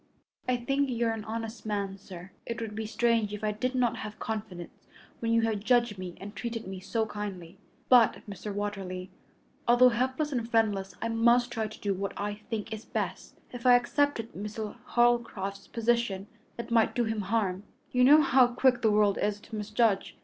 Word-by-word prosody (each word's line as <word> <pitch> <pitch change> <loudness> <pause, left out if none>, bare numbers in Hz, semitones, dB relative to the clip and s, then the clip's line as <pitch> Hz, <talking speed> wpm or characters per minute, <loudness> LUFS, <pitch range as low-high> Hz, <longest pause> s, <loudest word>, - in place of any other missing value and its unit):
"I 250 - +3
think 275 +3 0
you 240 -1 0
are 225 - +2
an 220 -1 -5
honest 225 0 -5
man, 200 -2 -2
sir. 190 -1 -11 0.2
It 235 0 -3
would 225 -2 -5
be 220 0 -4
strange 225 -2 +1
if 210 - -10
I 215 - +1
did 255 +5 -2
not 245 -2 +1
have 215 -1 -7
confidence 210 -6 -6 0.3
when 230 -1 -1
you 230 0 +4
have 220 -2 0
judged 235 -2 +2
me 180 -2 -6
and 205 +2 -9
treated 230 -1 -4
me 190 0 -6
so 220 +4 -1
kindly. 195 -4 -7 0.3
But, 240 -4 +4
Mr. 205 +1 -6
Watterly, 195 -2 -4 0.6
although 245 +1 +7
helpless 260 +5 -1
and 235 -4 -2
friendless, 205 -4 +1
I 230 - -1
must 240 +2 +3
try 225 -2 -2
to 215 - -12
do 200 -1 0
what 195 +1 -3
I 205 +1 -2
think 220 +1 -5
is 220 0 -6
best. - - -4
If 245 0 -3
I 245 - +9
accepted 245 -1 +1
Mr. 210 +2 -5
Holcroft's 235 -6 +1
position 230 -4 0 0.3
it 235 - -6
might 230 -1 +3
do 240 - +2
him 220 -1 -1
harm. 195 -2 0 0.3
You 250 0 +3
know 300 +4 +8
how 260 -2 +5
quick 245 0 +2
the 220 - +4
world 210 -1 +3
is 205 0 0
to 220 - -9
misjudge. 210 -1 0
220 Hz, 195 wpm, -29 LUFS, 205-240 Hz, 0.6 s, I